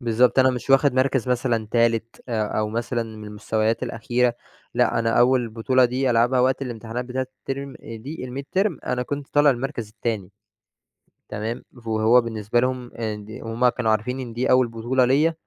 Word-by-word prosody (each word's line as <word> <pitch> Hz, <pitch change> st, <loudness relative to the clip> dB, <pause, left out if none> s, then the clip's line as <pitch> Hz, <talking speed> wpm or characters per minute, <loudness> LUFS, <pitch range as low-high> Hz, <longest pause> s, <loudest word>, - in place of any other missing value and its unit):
بالضبط، 120 Hz, +1 st, +3 dB
أنا 130 Hz, 0 st, +6 dB
مش 125 Hz, +1 st, -5 dB
واخد 135 Hz, 0 st, +5 dB
مَركَز 130 Hz, -1 st, +1 dB
مثلًا 120 Hz, -3 st, 0 dB
3 115 Hz, -1 st, +1 dB
آآ، 110 Hz, -3 st, -1 dB
أو 105 Hz, 0 st, 0 dB
مثلًا 115 Hz, +1 st, -2 dB
من 105 Hz, -, -9 dB
المستويات 110 Hz, +2 st, -1 dB
الأخيرة، 120 Hz, +1 st, 0 dB, 0.4 s
لأ، 120 Hz, -1 st, +2 dB
أنا 115 Hz, 0 st, +1 dB
أول 125 Hz, -1 st, +3 dB
بطولة 125 Hz, +3 st, +2 dB
دي 130 Hz, +1 st, +1 dB
ألعبها 120 Hz, +2 st, +3 dB
وقت 130 Hz, +2 st, +2 dB
الامتحانات 120 Hz, 0 st, -5 dB
بتاعة 130 Hz, +1 st, -3 dB
الترم 135 Hz, 0 st, -5 dB
دي 125 Hz, +6 st, -7 dB
الميدترم 140 Hz, +7 st, -2 dB
أنا 125 Hz, 0 st, 0 dB
كنت 140 Hz, +2 st, -5 dB
طالع 145 Hz, 0 st, +4 dB
المركز 125 Hz, -3 st, -3 dB
التاني 105 Hz, -3 st, -4 dB, 1.0 s
تمام، 110 Hz, +3 st, -4 dB, 0.2 s
ف -, -, -21 dB
وهو 110 Hz, +2 st, +4 dB
بالنسبة 115 Hz, 0 st, -1 dB
لهم 130 Hz, +1 st, +1 dB
هُم -, -, -15 dB
آآ، 110 Hz, -2 st, -3 dB
ند 105 Hz, +1 st, -11 dB
وهُم 115 Hz, +2 st, +1 dB
كانوا 120 Hz, -2 st, 0 dB
عارفين 125 Hz, +5 st, 0 dB
إن 120 Hz, -3 st, -6 dB
دي 125 Hz, +3 st, -1 dB
أول 125 Hz, -1 st, +4 dB
بطولة 120 Hz, +3 st, +1 dB
ليَّ. 145 Hz, +6 st, +3 dB
120 Hz, 180 wpm, -23 LUFS, 115-130 Hz, 1.0 s, أنا